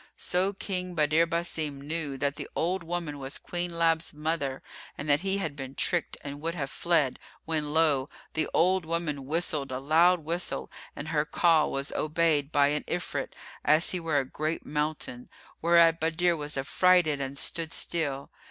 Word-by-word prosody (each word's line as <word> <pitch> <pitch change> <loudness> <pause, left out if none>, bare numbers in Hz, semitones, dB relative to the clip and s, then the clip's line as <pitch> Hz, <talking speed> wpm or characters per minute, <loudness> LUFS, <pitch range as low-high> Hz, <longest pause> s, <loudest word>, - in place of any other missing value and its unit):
So 185 +3 +1
King 185 -2 -3
Badr 155 +1 +3
Basim 165 -3 -2
knew 145 -1 -3
that 140 +1 0
the - - -6
old 180 +2 0
woman 165 -4 -4
was 135 +1 -3
Queen 175 -1 -4
Lab's 165 -1 +2
mother 150 -3 -2 0.3
and 145 - -6
that 145 0 +4
he 195 +1 0
had 160 -7 -3
been 135 -1 -7
tricked 175 -2 0
and 145 0 -7
would 165 +2 -2
have 135 -5 -4
fled; 160 -7 +1 0.3
when, 155 -2 -1
lo! 150 -4 +2 0.2
the 160 - 0
old 185 +2 +3
woman 160 -4 -3
whistled 150 -3 -1
a 130 - -2
loud 165 +6 +4
whistle 160 - -2 0.2
and 145 +2 -6
her 150 -2 +1
call 160 0 +3
was 140 +1 -3
obeyed 155 -2 +1
by 145 -2 +4
an 150 +1 -1
Ifrit 175 0 -3 0.3
as 155 +2 +4
he 185 - -1
were 165 -3 0
a 135 - +1
great 155 +5 -3
mountain, 150 -4 -3 0.3
whereat 165 0 +5
Badr 165 +2 +2
was 150 -2 -3
affrighted 155 +1 +3
and 135 +1 -4
stood 165 +3 +3
still. 145 -6 0
160 Hz, 170 wpm, -28 LUFS, 145-170 Hz, 0.3 s, whereat